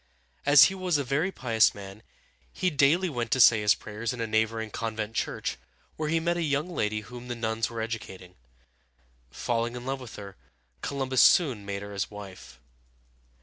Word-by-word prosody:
As 145 0 +9
he 190 - +4
was 185 -4 0
a 140 - -1
very 145 +9 0
pious 115 - +2
man, 100 +1 -10 0.5
he 185 -1 -1
daily 150 +6 +3
went 120 -7 -3
to 130 - 0
say 115 -3 +7
his 105 0 +4
prayers 110 +3 -5
in 125 - -8
a 115 - -1
neighboring 110 0 -1
convent 110 -1 -4
church, - - -3 0.4
where 155 -1 -3
he 165 +1 +2
met 170 +1 0
a - - -1
young 145 0 0
lady 110 -8 -1
whom 120 +3 -10
the 120 - -4
nuns 115 -1 -2
were 115 -1 -5
educating. 105 -5 -6 1.0
Falling 115 - -2
in 125 0 -7
love 135 +1 -3
with 125 - -10
her, 100 -2 -9 0.5
Columbus 135 -2 0
soon 125 - +4
made 100 0 -4
her 100 0 -8
his 100 -1 -2
wife. 95 -10 -11
115 Hz, 185 wpm, -27 LUFS, 105-140 Hz, 1.0 s, As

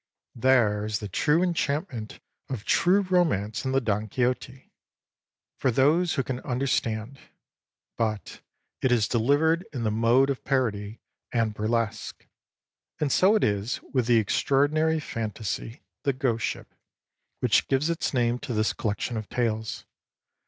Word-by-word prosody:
There 115 -5 +3
is 105 0 -1
the 105 - -6
true 150 - +2
enchantment 150 - -2 0.3
of 120 -6 -5
true 190 +3 +3
romance 165 - 0
in 130 - 0
the 135 - +3
Don 110 -3 -1
Quixote 125 +3 -2 0.9
for 130 - +2
those 155 +8 +3
who 135 - 0
can 125 -1 -4
understand 125 -1 -2 0.8
but 110 -3 -3 0.4
it 130 - +2
is 115 -3 +3
delivered 145 +8 +2
in 125 -5 -4
the 110 - +1
mode 120 +5 +3
of 135 - -5
parody 110 -6 -1 0.3
and 115 -3 0
burlesque; 110 0 -2 0.7
and 145 -2 0
so 195 +9 +4
it 215 - +2
is 100 +3 0
with 125 -4 +1
the 120 -1 +5
extraordinary 145 +8 +2
fantasy, 115 -2 -5
" - - -62
The 140 - +1
Ghost 125 -3 0
Ship," - - -6 0.7
which - - +2
gives 135 +3 +1
its 165 - -2
name 120 -2 +1
to 130 -4 -5
this 110 +1 +1
collection 110 +2 -2
of 110 -1 -6
tales. 110 -3 -2
125 Hz, 145 wpm, -26 LUFS, 110-140 Hz, 0.9 s, the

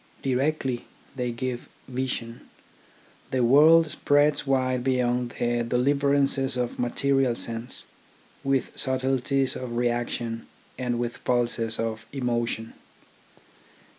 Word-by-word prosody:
Directly, 135 -1 0 0.3
they 125 -2 -2
give 125 0 -4 0.2
vision. 125 -3 -3 0.9
The 130 -1 +1
world 155 +5 +6
spreads 145 0 +2
wide 130 -2 +1
beyond 125 -1 0
the 120 0 +1
deliverances 140 +2 +2
of 125 -1 -2
material 130 +1 +1
sense, 115 +1 -4 0.6
with 135 -1 0
subtle 130 0 +1
ties 135 +1 0
of 125 -2 -5
reaction 120 -1 -2 0.3
and 125 -2 -2
with 120 0 -4
pulses 120 -2 0
of 115 0 -3
emotion. 120 -3 -2
125 Hz, 105 wpm, -26 LUFS, 120-135 Hz, 0.9 s, world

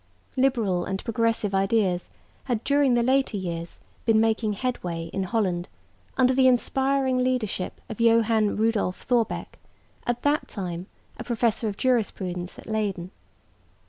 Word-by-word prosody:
Liberal 235 -9 +2
and 190 0 -4
progressive 230 -3 0
ideas 195 -2 +1 0.4
had 240 -4 -1
during 280 -3 +3
the 240 - +3
later 265 -3 +2
years 170 -3 -5 0.2
been 225 -2 +4
making 220 -1 +1
headway 175 -8 -3
in 195 - -1
Holland 185 -3 -1 0.5
under 260 0 +4
the 260 0 +5
inspiring 265 +1 +2
leadership 250 -7 -1
of 220 +1 -6
Johan 225 -2 +3
Rudolf 220 -4 0
Thorbecke, 240 -3 -1 0.5
at 240 0 -1
that 290 +1 +1
time 180 -2 -5 0.3
a - - -4
professor 230 -1 0
of 200 -1 -4
jurisprudence 190 -8 -1
at - - -11
Leyden. 200 -5 -2
225 Hz, 135 wpm, -25 LUFS, 190-250 Hz, 0.5 s, the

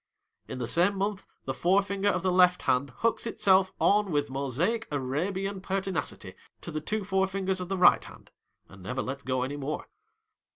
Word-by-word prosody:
In - - -6
the 125 -2 -3
same 180 - +3
month, 200 0 -2 0.2
the 135 - -2
forefinger 195 +5 +1
of 185 -3 -1
the 185 - +2
left 180 0 +4
hand 130 +2 +1
hooks 230 - -1
itself 190 -4 +3
on 205 0 +3
with 145 -2 0
Mosaic 140 - -1
Arabian 185 +9 -2
pertinacity 190 -5 -3 0.3
to - - -7
the 155 - -3
two 215 +5 -2
forefingers 190 -1 0
of 180 - -6
the 195 - -1
right 180 - +6
hand, - - -14 0.4
and 100 -1 -15
never 125 +8 -3
lets 135 +2 -5
go 130 -2 -1
any 140 +3 -4
more. 145 +2 -4
185 Hz, 175 wpm, -28 LUFS, 140-195 Hz, 0.4 s, right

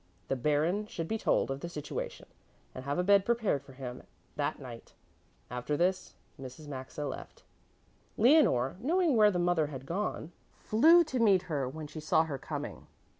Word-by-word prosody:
The - - +1
Baron 150 - 0
should 165 -5 -5
be 220 +4 -2
told - - +1
of 135 - -3
the 170 - -6
situation 150 -4 -6 0.5
and 130 - -8
have 140 +3 -1
a 180 - +1
bed 200 +1 +5
prepared 220 - +1
for 135 - -14
him 130 -1 -7 0.3
that - - -1
night. - - -10 0.6
After 125 +4 -2
this 185 +2 0 0.3
Mrs. 130 +4 -9
Maxa 135 +1 -6
left. - - -8 0.7
Leonore, 215 - +4
knowing 325 - +2
where 210 -2 +6
the 185 - -1
mother 175 -3 +2
had 135 -3 -8
gone, 175 -1 -3 0.2
flew 325 +11 +5
to 265 -6 -3
meet 200 -5 +4
her 145 -7 -2
when 155 +3 -7
she 150 +2 -8
saw 155 +1 +3
her 145 -4 -5
coming. - - -6
165 Hz, 175 wpm, -31 LUFS, 140-210 Hz, 0.7 s, where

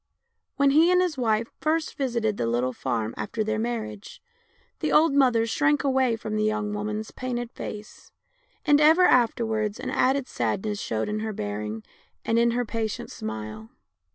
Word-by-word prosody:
When 280 -1 +3
he 320 +5 +5
and 360 - +4
his 360 -4 +1
wife 230 -3 0
first 315 +1 0
visited 235 -6 -1
the 115 - -1
little 120 +2 0
farm 115 -4 -2
after 110 - -2
their 215 0 -1
marriage 220 -3 -4 0.6
the - - -1
old 310 -1 +5
mother 250 -5 +4
shrank 295 +6 +1
away 265 -3 +2
from 220 -1 -5
the 215 - +1
young 215 -1 -1
woman's 210 +1 -4
painted 240 -2 -4
face, 210 0 -9 0.5
and 295 0 +5
ever 320 +4 +6
afterwards 225 -5 +2
an - - -4
added 265 0 +1
sadness 195 - -2
showed 110 -1 -2
in 210 0 -2
her 220 0 -3
bearing 105 - -4 0.4
and 225 +1 +2
in 235 0 +4
her 245 +1 0
pa 225 0 -2
tient 215 - -7
smile. 110 0 -6
220 Hz, 170 wpm, -25 LUFS, 205-260 Hz, 0.6 s, ever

